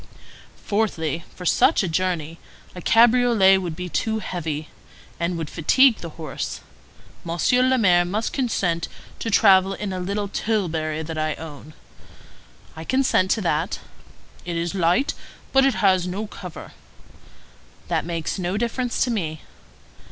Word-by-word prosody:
"Fourthly, 170 -7 -1
for 180 - -9
such - - +4
a - - -1
journey 165 -2 -2 0.3
a 180 - -8
cabriolet 230 -4 +5
would 175 -4 -4
be 180 +1 -5
too 220 +5 -1
heavy, 160 -7 -4 0.5
and 170 +1 -1
would 165 -2 -4
fatigue 245 - +4
the 170 - -7
horse. 160 -2 -5 0.6
Monsieur 170 +9 +1
le 255 0 +3
Maire 180 -6 +4
must 205 +6 -2
consent 180 -10 0 0.3
to 230 - -3
travel 195 -2 +5
in 200 -1 -4
a 185 - -3
little 200 +3 -2
tilbury 165 -8 -1
that 160 0 -5
I 155 -1 -1
own." 155 -1 -10 1.0
"I 160 - -7
consent 255 -4 +2
to 220 - +1
that." 165 +1 0 0.7
"It 175 - -4
is 170 +1 -2
light, 185 - +2 0.4
but 270 0 +5
it 270 - +1
has 185 -3 +3
no 195 +4 -3
cover." 180 -5 -9 1.2
"That - - 0
makes 165 +1 -3
no 180 +2 -1
difference 240 +2 -1
to 250 - -1
me." 160 -8 -3
185 Hz, 145 wpm, -23 LUFS, 165-220 Hz, 1.2 s, cabriolet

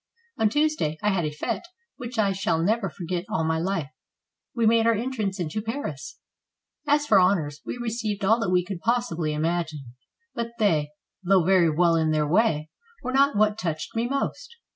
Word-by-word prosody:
On 220 - +4
Tuesday 295 - 0
I 210 - +3
had 180 -4 0
a - - 0
fete 150 - -3 0.4
which 245 0 -7
I 205 -3 +3
shall 190 -3 0
never 200 +4 +1
forget 175 +1 -4
all 160 - 0
my 160 0 0
life. 165 -5 -2 0.6
We 235 -2 +1
made 225 +1 +4
our 230 - +4
en 240 +5 -2
trance 205 -6 -3
into 175 +5 -2
Paris. 215 - -5 0.7
As 295 0 +3
for 210 -9 +5
honors, 160 -6 +1
we - - -4
received 220 -4 -3
all 225 +4 +4
that 225 - -1
we 180 -1 +2
could 190 -2 -5
possibly 185 -8 0
imagine; 155 -4 -2 0.4
but 235 0 -4
they, 160 -9 +2 0.3
though 190 -1 +4
very 185 -3 +4
well 170 +2 +3
in 160 -1 +2
their 155 -1 +1
way, 160 -4 +1 0.3
were 255 - -3
not 275 -3 +3
what 210 0 +2
touched 160 +1 -4
me 230 +1 0
most. 465 - -3
195 Hz, 185 wpm, -25 LUFS, 160-230 Hz, 0.7 s, for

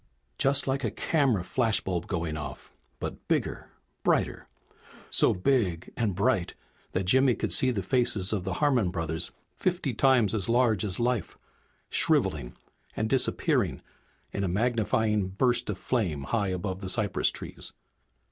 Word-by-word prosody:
Just 140 +1 +2
like 135 0 -1
a - - +1
camera 135 - +1
flashbulb 95 -6 0
going 85 -5 -2
off, 75 -1 -7 0.3
but - - -6
bigger, - - -1 0.3
brighter. - - 0 0.6
So - - +4
big 90 -5 0
and 110 -6 0
bright 100 -3 +1 0.4
that 95 - 0
Jimmy 130 +6 +4
could - - -1
see 130 - +4
the 105 -6 -1
faces 110 -3 +1
of 100 -4 -1
the 95 - -2
Harmon 130 -10 +2
brothers 80 -2 -3 0.3
fifty 175 -8 -1
times 120 -4 +3
as 105 -1 -1
large 115 -4 +3
as 95 -4 -2
life, 120 -2 -1 0.5
shriveling - - +1 0.4
and 110 0 -1
disappearing 135 -2 +1 0.5
in 100 - -2
a - - +1
magnifying 110 0 +1
burst 120 +6 +1
of 100 - -2
flame 90 - -1
high 100 +7 0
above 95 0 -3
the 95 - -4
cypress 105 -2 +2
trees. - - -7
105 Hz, 145 wpm, -28 LUFS, 95-125 Hz, 0.6 s, So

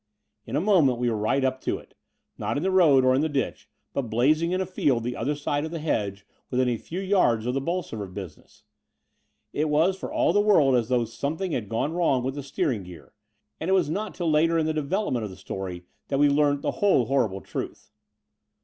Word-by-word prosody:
' 105 - -53
In - - -4
a - - +2
moment 170 - +4
we 120 0 0
were - - -1
right 110 +6 +1
up 130 0 0
to - - -1
it - - -16 0.2
— - - -43
^not - - -1
in 145 - -2
the 190 - +1
road 150 -8 +5
or 130 - +5
in 130 - +2
the 160 - 0
ditch, 140 -2 -3 0.2
but 130 -4 -2
blazing 155 +9 +2
in 185 - 0
a 190 - 0
field 140 -10 0
the 125 +1 -3
other 145 +6 -1
side 145 0 -2
of 160 - -3
the 165 - -5
hedge 105 -10 -2 0.2
within 130 0 +1
a 120 -2 0
few 170 +10 -6
yards 185 - +2
of 125 - 0
the 135 - -1
Bolsover 140 - -3
business. 90 -2 -10 0.9
It 155 +1 0
was 160 +6 +3
for 190 - -7
all - - +2
the 205 - +4
world 155 -11 +4
as 120 -1 +1
though 125 -2 +2
something 155 - -3
had 110 -9 -3
gone 115 +8 -1
wrong 160 -8 +1
with 130 +1 -2
the 145 - -5
steer 140 +1 -1
ing 110 -5 -3
gear; 90 +3 -13 0.5
and 165 - -3
it - - +3
was 175 -6 +2
not 210 +5 -3
till 170 -3 0
later 165 +2 +3
in 160 - +1
the 160 - 0
develop 155 +7 -1
ment 120 -3 -1
of 105 - -4
the 95 - -10
story 90 -2 -6 0.2
that 135 - -1
we 145 +1 +5
learnt 145 0 +2
the - - 0
whole 195 -12 +4
horrible 115 -7 0
truth. - - -7
140 Hz, 240 wpm, -26 LUFS, 120-165 Hz, 0.9 s, road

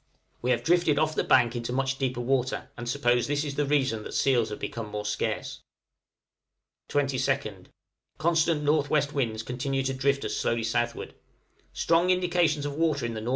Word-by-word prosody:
We 125 - -1
have - - +1
drifted 170 -3 +3
off 155 +1 +2
the - - 0
bank 125 -2 +4
into 120 0 -3
much 135 +1 -1
deeper 125 -2 -1
water, 130 0 -1
and 120 -1 -6
suppose 120 -3 +2
this 145 +1 0
is 145 -2 -4
the 145 0 -1
reason 135 -6 +1
that - - -7
seals 120 -5 +2
have 105 - -5
become 115 -2 -5
more 105 0 -5
scarce. 105 - -2 1.3
22nd. 135 -8 -1 0.5
Constant 165 -1 +2
N.W. 150 0 +3
winds 115 -5 -1
continue 135 +3 -2
to 135 0 -1
drift 140 +1 0
us - - -2
slowly 115 -1 0
southward. 120 +1 -2 0.6
Strong 170 +2 +2
indications 175 -5 +2
of 145 - -3
water 150 -4 0
in 115 - -3
the 110 - -4
N.W. 110 +3 -4
135 Hz, 175 wpm, -27 LUFS, 120-150 Hz, 1.3 s, bank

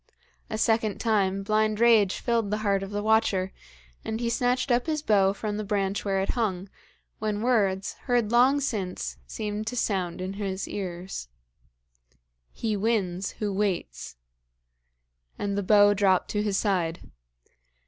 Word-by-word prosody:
A 215 - -3
second 220 -1 +1
time 195 -4 +1
blind 215 +1 +1
rage 225 -5 +5
filled 230 -4 0
the 210 - 0
heart 200 -1 +2
of 195 - -5
the 205 0 -3
watcher, 215 -4 +2 0.5
and 220 0 -3
he 235 -1 -1
snatched 250 +2 +1
up 240 +4 +2
his 305 -1 -1
bow 195 -6 +4
from 205 +1 -4
the 215 - -3
branch 200 -1 -1
where 195 -1 0
it 195 - -3
hung, 200 -6 -1 0.5
when 215 0 -2
words, 205 -5 +1
heard 240 -4 +1
long 255 +4 +5
since, 185 - -3
seemed 210 - -4
to 245 - -3
sound 185 -6 -1
in 185 +1 -4
his 195 -1 -3
ears: 180 - -5 1.2
'He 220 -2 -2
wins 195 -3 -1
who 210 -2 -3
waits.' 190 - -2 1.2
And 200 -1 -2
the 200 - 0
bow 205 +1 +5
dropped 190 -2 +2
to 210 - 0
his 205 -2 0
side. 175 -5 -1
205 Hz, 150 wpm, -26 LUFS, 195-220 Hz, 1.2 s, rage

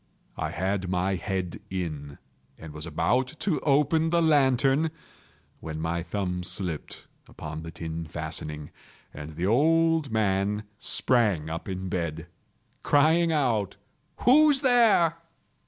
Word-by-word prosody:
I - - -3
had 95 +1 -2
my 90 +1 0
head 95 -1 -3
in, 75 -6 -5 0.4
and 80 -2 -10
was 75 +1 -7
about 125 - 0
to 180 -7 0
open 150 +3 +2
the 170 +1 +2
lantern, 140 -1 +3 0.7
when 80 -1 -6
my 85 +2 -2
thumb 90 +1 -3
slipped 90 -3 -4 0.2
upon 80 0 -7
the 80 - -7
tin 80 0 -6
fastening, 75 0 -5 0.4
and 75 +1 -8
the 85 +3 -2
old 160 +6 +3
man 105 -1 0 0.2
sprang 100 -11 +1
up 85 +4 -5
in 95 0 -4
bed, 85 -3 -3 0.6
crying 160 +3 +3
out—"Who's 150 - +1
there?" 225 -10 +4
100 Hz, 120 wpm, -26 LUFS, -, 0.7 s, there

